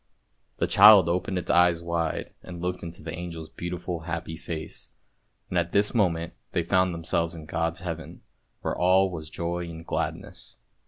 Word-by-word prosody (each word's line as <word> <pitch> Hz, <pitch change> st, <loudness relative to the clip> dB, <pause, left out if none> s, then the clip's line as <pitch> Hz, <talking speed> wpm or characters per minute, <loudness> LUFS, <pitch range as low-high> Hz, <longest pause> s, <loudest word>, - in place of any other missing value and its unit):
The -, -, +1 dB
child 100 Hz, -3 st, +8 dB
opened 90 Hz, +2 st, 0 dB
its 90 Hz, -, -1 dB
eyes 85 Hz, -1 st, +4 dB
wide 85 Hz, -2 st, -2 dB
and 90 Hz, -1 st, -9 dB
looked 90 Hz, +1 st, -2 dB
into 85 Hz, -2 st, -8 dB
the 80 Hz, +1 st, -5 dB
angel's 85 Hz, -2 st, -6 dB
beautiful 85 Hz, 0 st, -4 dB
happy 80 Hz, -1 st, -4 dB
face, 80 Hz, -1 st, -6 dB, 0.6 s
and 90 Hz, -, +1 dB
at 85 Hz, 0 st, -2 dB
this 105 Hz, +1 st, +3 dB
moment 85 Hz, -7 st, +1 dB, 0.2 s
they 85 Hz, -, +1 dB
found 95 Hz, +1 st, +2 dB
them 85 Hz, -1 st, -6 dB
selves 85 Hz, 0 st, 0 dB
in 80 Hz, -2 st, -9 dB
God's 80 Hz, +1 st, -2 dB
Heaven, 85 Hz, -3 st, -6 dB, 0.4 s
where -, -, -2 dB
all 95 Hz, +1 st, +4 dB
was 80 Hz, -3 st, -6 dB
joy 85 Hz, 0 st, -3 dB
and 80 Hz, 0 st, -9 dB
gladness. -, -, -4 dB
85 Hz, 170 wpm, -27 LUFS, 85-90 Hz, 0.6 s, child